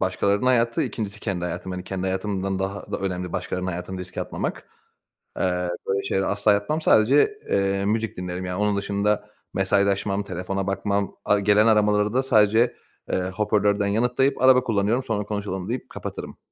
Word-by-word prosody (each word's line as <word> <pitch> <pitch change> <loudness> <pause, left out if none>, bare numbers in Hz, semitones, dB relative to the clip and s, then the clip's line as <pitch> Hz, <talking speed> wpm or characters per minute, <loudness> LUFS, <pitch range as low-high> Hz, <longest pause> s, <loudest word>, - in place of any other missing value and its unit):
başkalarının 100 +5 +1
hayatı, 120 -2 +3
2'ncisi 105 -2 -4
kendi 95 -5 -3
hayatım. 90 +2 -4
Hani, 90 0 -5
kendi 95 -1 -4
hayatımdan 95 0 -2
daha 100 +1 -4
da - - -1
önemli 90 -2 -3
başkalarının 90 0 -3
hayatını 90 +2 -5
riske 90 0 -6
atmamak. - - -4 0.7
Eee, 90 -1 0 0.2
böyle 100 +1 +1
şeyleri 95 0 0
asla 100 +1 +2
yapmam. 105 +11 -1
Sadece, 140 - +4
eee, 100 0 +1
müzik 110 +1 -1
dinlerim 90 0 -4
yani. 90 +2 -3
Onun 105 -1 +1
dışında 100 +1 0 0.2
mesajlaşmam, 100 +1 +1
telefona 95 +1 -3
bakmam, 100 +1 -1
ar 105 - +4
gelen 105 +2 +4
aramaları 105 -1 +3
da 130 +1 +2
sadece, 110 -1 +3 0.4
ııı, 90 0 -1
hoparlörden 100 0 +1
yanıtlayıp, 125 +6 +1
"Araba 130 -1 +6
kullanıyorum, 110 +2 +1
sonra 110 -4 -1
konuşalım." 100 -2 -4
deyip 125 +2 -4
kapatırım. - - -7
100 Hz, 160 wpm, -24 LUFS, 95-105 Hz, 0.7 s, Araba